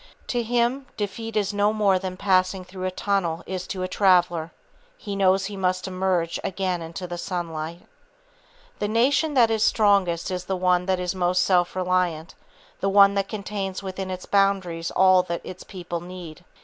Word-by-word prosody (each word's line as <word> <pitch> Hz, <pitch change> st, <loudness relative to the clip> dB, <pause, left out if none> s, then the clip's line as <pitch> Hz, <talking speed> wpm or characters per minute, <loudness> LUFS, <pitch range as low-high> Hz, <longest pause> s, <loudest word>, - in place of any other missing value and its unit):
To 245 Hz, -, 0 dB
him, 240 Hz, +3 st, 0 dB
defeat 220 Hz, +2 st, -4 dB
is 205 Hz, 0 st, 0 dB
no 205 Hz, +1 st, +2 dB
more 205 Hz, -3 st, +2 dB
than 185 Hz, -1 st, -5 dB
passing 185 Hz, -1 st, +1 dB
through 185 Hz, 0 st, -7 dB
a -, -, +1 dB
tunnel 185 Hz, -3 st, -1 dB
is 185 Hz, -1 st, -5 dB
to 185 Hz, -2 st, -4 dB
a -, -, -1 dB
traveller, 180 Hz, -4 st, +2 dB, 0.5 s
he 200 Hz, -1 st, -6 dB
knows 195 Hz, 0 st, +3 dB
he 205 Hz, +1 st, -5 dB
must 185 Hz, -1 st, -1 dB
emerge 185 Hz, -3 st, -1 dB
again 185 Hz, -2 st, -2 dB
into 165 Hz, +3 st, -6 dB
the 175 Hz, -1 st, -6 dB
sunlight. 170 Hz, -2 st, -4 dB, 1.0 s
The 205 Hz, -, 0 dB
nation 275 Hz, +7 st, +2 dB
that 235 Hz, -3 st, +5 dB
is 220 Hz, -1 st, 0 dB
strongest 200 Hz, -6 st, +2 dB
is 180 Hz, -1 st, -3 dB
the 190 Hz, -, -1 dB
one 180 Hz, 0 st, +2 dB
that 185 Hz, -1 st, +1 dB
is 180 Hz, 0 st, -2 dB
most 180 Hz, -1 st, +1 dB
self 180 Hz, -2 st, +2 dB
reliant, 180 Hz, -3 st, 0 dB, 0.5 s
the 195 Hz, -, 0 dB
one 200 Hz, 0 st, +6 dB
that 200 Hz, -1 st, -1 dB
contains 200 Hz, -2 st, -4 dB
within 190 Hz, 0 st, -5 dB
its 185 Hz, 0 st, -5 dB
boundaries 190 Hz, -4 st, +1 dB
all 185 Hz, 0 st, +5 dB
that 170 Hz, -1 st, -4 dB
its 185 Hz, 0 st, -9 dB
people 175 Hz, -3 st, -6 dB
need. 175 Hz, -2 st, -9 dB
185 Hz, 175 wpm, -24 LUFS, 180-200 Hz, 1.0 s, one